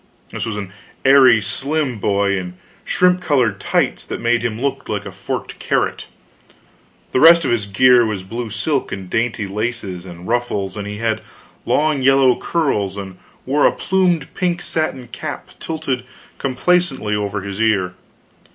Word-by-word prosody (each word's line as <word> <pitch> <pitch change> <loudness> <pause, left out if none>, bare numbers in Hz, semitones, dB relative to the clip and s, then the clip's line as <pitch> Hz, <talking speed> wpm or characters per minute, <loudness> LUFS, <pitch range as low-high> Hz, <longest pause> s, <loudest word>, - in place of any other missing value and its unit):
This - - -4
was 110 -2 -3
an 100 -2 -6 0.3
airy 130 -4 +7
slim 135 +5 -2
boy 100 0 +1
in 90 -1 -5 0.3
shrimp 180 0 +2
colored 125 - +1
tights - - 0
that - - -5
made 120 0 +2
him 115 -2 -2
look 135 +1 -2
like 105 -1 -2
a 100 - -6
forked 95 +1 -5
carrot, - - -1 1.0
the - - +2
rest 165 +2 +8
of - - +1
his 110 -4 0
gear 125 +4 +5
was 105 -4 -2
blue 115 +4 -5
silk 125 +6 -1
and 95 -2 -6
dainty 115 -2 0
laces 100 -3 -4
and 85 0 -10
ruffles; 115 -5 -1
and 105 -1 -5
he 105 0 -5
had 110 0 -1 0.5
long 150 -2 +2
yellow 135 -1 +5
curls, 105 - -1
and 95 -2 -7 0.3
wore 145 +3 +3
a - - +3
plumed 180 -6 0
pink 180 -2 -1
satin 135 -6 -2
cap 130 - -6
tilted 155 -6 -3 0.4
complacently 135 -4 +1
over 105 -1 -2
his 100 +2 -5
ear. 100 -5 +2
120 Hz, 160 wpm, -19 LUFS, 100-135 Hz, 1.0 s, rest